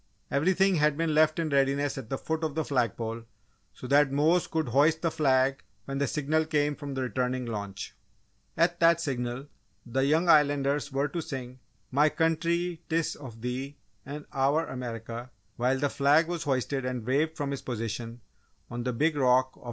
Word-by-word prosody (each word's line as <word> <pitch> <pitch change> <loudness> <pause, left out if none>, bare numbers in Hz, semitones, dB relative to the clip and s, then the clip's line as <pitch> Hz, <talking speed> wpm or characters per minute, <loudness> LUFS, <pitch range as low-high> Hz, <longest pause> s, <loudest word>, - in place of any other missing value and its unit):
Everything 185 +6 +3
had 150 -1 +2
been 165 -1 0
left 155 0 +4
in 165 -2 -1
readiness 140 0 +1
at 130 -5 -7
the 135 - -2
foot 160 +3 -3
of 155 -2 -2
the 160 -1 -1
flag 125 -5 0
pole 115 0 -4 0.5
so - - -11
that 140 +1 +4
Mose 155 +5 +3
could 160 -5 -1
hoist 155 +6 +3
the 165 - +1
flag 135 -2 +2 0.2
when 135 0 -4
the 140 - +1
signal 155 +2 0
came 150 -2 +1
from 140 -2 -6
the 130 - -1
returning 125 +1 -1
launch. 100 -3 -6 0.6
At 170 +1 +2
that 170 -1 +5
signal, 125 -4 -3 0.4
the 130 +2 0
young 155 +5 +2
Islanders 145 -2 +3
were 135 +2 0
to 170 - -3
sing 130 -4 -7 0.3
"My 145 +3 +4
Country 170 +1 0
'tis 165 0 0
of 120 -6 -11
Thee" 130 +4 -4 0.3
and 145 +2 -7
"Our 140 +4 +2
America," 120 -1 -6 0.3
while 125 +2 +1
the 145 - +1
flag 145 +4 +3
was 170 -2 -3
hoisted 135 0 -1
and 125 -3 -3
waved 150 +6 0
from 140 -2 -2
its 140 - -5
position 115 0 -5 0.5
on 120 0 -4
the 125 +1 -2
big 150 +6 +1
rock 130 -1 +3
of - - -34
Treasure - - -38
Cove. - - -22
140 Hz, 190 wpm, -28 LUFS, 125-155 Hz, 0.6 s, that